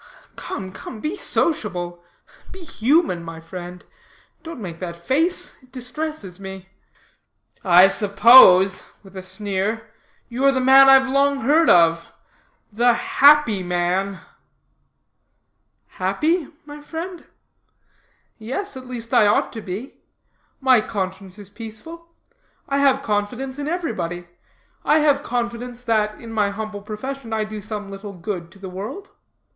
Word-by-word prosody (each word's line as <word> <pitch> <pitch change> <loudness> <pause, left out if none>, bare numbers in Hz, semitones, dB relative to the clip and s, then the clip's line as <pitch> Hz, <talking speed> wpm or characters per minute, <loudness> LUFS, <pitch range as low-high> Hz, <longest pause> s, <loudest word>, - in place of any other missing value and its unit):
"Come, 190 -1 -6
come, 215 - -9
be 305 - -3
sociable 180 - -1 0.5
be 380 -1 -10
human, 270 - +1
my 165 -1 -8
friend. 175 +1 -9 0.6
Don't 330 -4 -9
make 170 -6 -7
that 175 -2 -6
face; 285 - -1
it 255 -1 -24
distresses 255 - -6
me." 190 -1 -9 0.9
"I 180 0 +7
suppose," 195 -2 +6 0.2
with 195 -1 -16
a 190 - -6
sneer, 195 +3 -4 0.4
"you 245 +3 -4
are 275 - +6
the 265 - -1
man 270 +1 +7
I've 270 0 +6
long 275 +1 +1
heard 305 +6 +3
of 165 -1 +4 0.7
The 240 +3 +3
Happy 280 -4 +4
Man." 180 +2 -1 1.6
"Happy? 330 -1 -1 0.2
my 295 0 -10
friend. 330 +4 -7 1.1
Yes, 265 - -5
at 260 -1 -10
least 235 -2 -7
I 210 - +5
ought 205 - +1
to 225 - -6
be. 205 +8 -7 0.6
My 260 -4 +4
conscience 190 -2 -5
is 205 -1 -12
peaceful. 230 +11 -10 0.6
I 275 0 0
have 275 -1 +3
confidence 245 +6 -3
in 290 - -4
everybody. 220 - -4 0.6
I 300 - +3
have 290 -2 +3
confidence 245 -1 -4
that, 215 -3 0
in 230 -1 -9
my 210 -2 +1
humble 210 0 -6
profession, 230 +4 -7
I 220 -1 0
do 215 0 -7
some 210 -1 -6
little 200 +1 -8
good 175 -2 -6
to 175 - -18
the 195 -1 -9
world. 200 - -8
220 Hz, 135 wpm, -21 LUFS, 190-270 Hz, 1.6 s, I